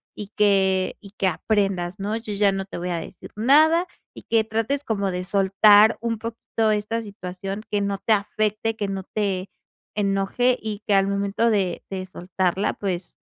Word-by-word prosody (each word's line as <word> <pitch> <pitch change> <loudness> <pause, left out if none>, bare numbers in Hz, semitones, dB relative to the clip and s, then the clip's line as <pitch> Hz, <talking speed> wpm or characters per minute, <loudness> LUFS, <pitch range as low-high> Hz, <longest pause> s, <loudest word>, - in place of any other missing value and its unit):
y 210 - -7
que 190 -2 +2
y 200 -1 -14
que 195 - -1
aprendas 195 -2 0
¿no? 210 +3 -2
Yo 220 -2 -6
ya 200 0 +3
no 195 0 -3
te 195 - -8
voy 175 +1 -4
a 175 - -1
decir - - -10
nada". 315 +9 +4 0.3
Y - - -12
que 225 -1 +2
trates 225 +6 -1
como 200 -5 -1
de 180 0 -3
soltar 205 +3 +5
un 230 -1 -1
poquito 225 0 -2
esta 210 +2 -1
situación, 195 -1 -6
que 205 - +1
no 200 -1 -2
te 225 - +1
afecte, 215 +2 -1
que 205 -2 -3
no 195 -1 -4
te 195 -3 -1 0.5
enoje 205 +5 +1
y 215 -1 -5
que 205 - +2
al 195 0 +3
momento 200 +3 0
de 190 -5 0
de 190 -1 -4
soltarla, 185 +1 -1
pues 185 -3 -4
200 Hz, 180 wpm, -23 LUFS, 195-220 Hz, 0.5 s, soltar